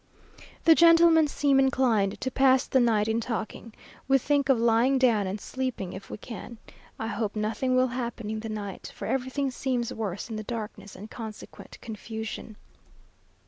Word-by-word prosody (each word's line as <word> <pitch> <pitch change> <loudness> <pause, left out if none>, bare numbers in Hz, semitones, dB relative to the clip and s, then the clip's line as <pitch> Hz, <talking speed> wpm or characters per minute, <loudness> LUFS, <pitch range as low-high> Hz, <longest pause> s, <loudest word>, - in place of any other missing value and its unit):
The 330 - +8
gentlemen 330 -1 +6
seem 285 -1 +2
inclined 245 -7 +2
to 260 - -2
pass 265 0 +4
the 260 - +2
night 220 -3 +2
in 225 +1 0
talking. 230 0 -5 0.4
We 270 0 +5
think 280 +1 0
of 265 - +5
lying 235 +3 +3
down, 230 -6 +3
and 195 +3 -4
sleeping 255 -7 -4
if 190 - -9
we - - -6
can. 235 +1 -9 0.4
I 220 - -4
hope 215 -1 -3
nothing 225 +5 0
will 255 0 +3
happen 235 -3 -4
in 220 - -3
the 225 +1 -6
night, 205 -3 -6
for - - -6
everything 265 +1 -1
seems 250 -2 -2
worse 205 -4 -4
in 225 -2 -5
the 215 - -5
darkness 210 -3 -6
and 210 +4 -10
consequent 220 -2 -9
confusion. 220 -1 -7
235 Hz, 170 wpm, -27 LUFS, 215-260 Hz, 0.4 s, The